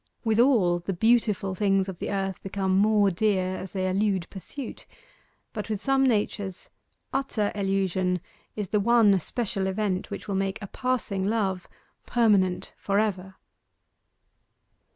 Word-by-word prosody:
With 220 -1 +1
all, 215 -9 +4
the 175 +3 -3
beautiful 215 -1 +2
things 195 -1 +1
of 190 -3 -7
the - - -3
earth 195 -2 -2
become 190 -1 -1
more 205 0 +4
dear 185 -1 +1
as 190 - -6
they 185 0 -2
elude 190 -2 0
pursuit; 240 +6 -7 0.7
but 210 0 -5
with 215 -2 -1
some 270 +3 +2
natures 205 -4 -2 0.4
utter 260 -6 0
elusion 190 -2 0 0.4
is 205 -4 -4
the 210 - +2
one 210 -2 +5
special 195 0 -2
event 190 -1 -1
which - - -7
will 200 - -2
make 195 +1 -1
a 210 - -6
passing 215 -4 -2
love 195 -4 -1 0.4
permanent 200 -6 +2
for 200 0 -1
ever. 190 -3 -1
195 Hz, 140 wpm, -26 LUFS, 190-215 Hz, 0.7 s, one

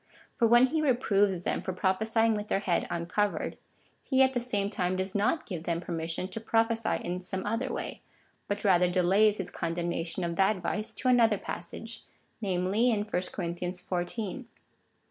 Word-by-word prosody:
For 235 - +3
when 240 +2 +7
he 310 +4 0
reproves 205 - +2
them - - -1
for 185 - -3
prophesying 220 +5 +2
with 210 0 -3
their 195 - 0
head 180 -4 0
uncovered, 175 +4 -1 0.5
he 265 -1 +3
at 265 0 +2
the 245 - 0
same 205 -4 -1
time 180 -2 0
does 190 +1 -2
not 210 +11 +1
give 175 -5 -6
them 170 -1 0
permission 165 +1 -3
to 225 - -4
prophesy 225 0 +1
in 180 +1 -3
some 190 +1 -4
other 230 +5 -1
way, - - -5 0.5
but 205 0 -2
rather 180 -2 +5
delays 195 +4 +4
his 190 - -4
condemnation 170 +1 -2
of 170 -1 -2
that 195 +2 +3
vice 210 +4 -3
to 260 - -3
an 245 -1 +5
other 225 -3 +4
passage, 225 +6 -6 0.4
namely 195 +4 +1
in 215 -3 +1
chapter 210 -4 -1
xiv. 180 +5 -3
195 Hz, 170 wpm, -29 LUFS, 180-225 Hz, 0.5 s, when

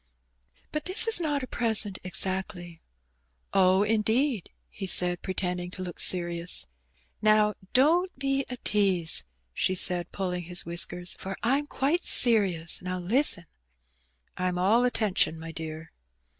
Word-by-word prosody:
"But 305 -1 -4
this 370 +4 +6
is 455 -3 +3
not 295 -5 -2
a - - -5
present 220 -5 +1
exactly." 180 -2 -3 0.7
"Oh, 190 0 +4
indeed," 220 - 0 0.2
he 195 - -7
said, 175 -1 +4
pretending 180 -2 -3
to 185 +1 -8
look 175 -2 -8
serious. 175 -1 -2 0.6
"Now, 215 0 +3 0.2
don^t 325 +8 +4
be 275 0 -1
a 250 - -5
tease," 190 -6 +1 0.3
she 185 - 0
said, 180 -1 -1
pulling 180 -3 -4
his 175 +1 -5
whiskersi, 175 +1 -6
"for 195 0 -6
Fm 275 +5 0
quite 295 +6 0
serious. 195 - +4
Now 185 0 -4
listen." 195 - +3 0.9
"I'm 180 0 -2
all 215 +7 +3
attention, 210 -9 0
my 165 0 -8
dear." 160 0 -8
190 Hz, 130 wpm, -27 LUFS, 175-240 Hz, 0.9 s, this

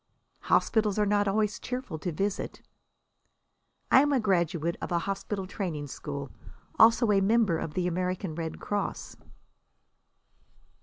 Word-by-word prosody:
"Hospitals 215 -3 +2
are 210 - +3
not 205 0 +2
always 210 +1 0
cheerful 250 -10 -5
to 175 - -3
visit." 195 +5 -3 1.3
"I 265 - +8
am 290 +1 +2
a 275 - +3
graduate 170 -5 0
of - - -5
a 170 - +2
hospital 195 +2 -3
training 175 -7 -4
school. 140 -1 -6 0.5
Also 230 0 +6
a 195 -1 +4
member 200 -4 +3
of 150 - -5
the 180 - 0
American 180 0 -2
Red 160 0 -5
Cross." 205 -1 -3
195 Hz, 135 wpm, -28 LUFS, 170-210 Hz, 1.3 s, I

